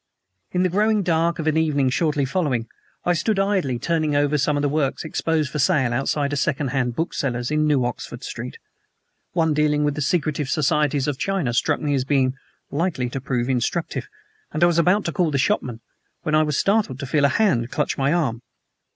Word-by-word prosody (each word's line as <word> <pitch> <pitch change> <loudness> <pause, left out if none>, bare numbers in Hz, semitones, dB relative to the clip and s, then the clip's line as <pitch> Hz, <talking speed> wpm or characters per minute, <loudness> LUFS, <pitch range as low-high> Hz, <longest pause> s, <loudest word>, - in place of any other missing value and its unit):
In 180 0 0
the 185 - +2
growing 210 +3 +2
dark 170 -1 +1
of 160 - -4
an 155 0 +2
evening 145 -5 +2
shortly 150 -1 +1
following 135 -6 -1 0.4
I 175 - +3
stood 210 +5 0
idly 195 -10 +1
turning 155 +2 0
over 145 +1 +2
some 145 +1 +1
of 145 - -1
the - - +3
works 145 -1 -1
exposed 155 -2 -1
for 150 - -3
sale 135 -5 +2
outside 140 +3 0
a - - +1
second 140 -2 0
hand 125 -2 -1
bookseller's 125 -5 -2
in 155 0 +2
New 140 -5 +2
Oxford 120 - -5
Street. - - -6 0.8
One 160 -3 +2
dealing 150 0 +2
with 145 -1 +1
the 150 - -4
secret 155 0 0
societies 150 -1 +1
of 145 -3 -2
China 190 -11 -1
struck - - +1
me 145 -1 0
as 135 -2 +1
being 135 -2 +1 0.4
likely 145 -6 -1
to 135 - -4
prove 125 -2 -1
instructive, 130 +6 -1 0.4
and 155 - 0
I - - +8
was 170 -1 +3
about 185 +5 +3
to 170 - -1
call 170 -1 +1
the 145 - 0
shopman 125 -3 0 0.4
when 155 - -2
I 155 - +5
was 150 -2 0
startled 200 - +1
to 140 - -4
feel 140 +2 +2
a - - +4
hand 160 - +1
clutch - - -1
my 140 +1 +1
arm. 135 -9 0
150 Hz, 205 wpm, -22 LUFS, 135-165 Hz, 0.8 s, I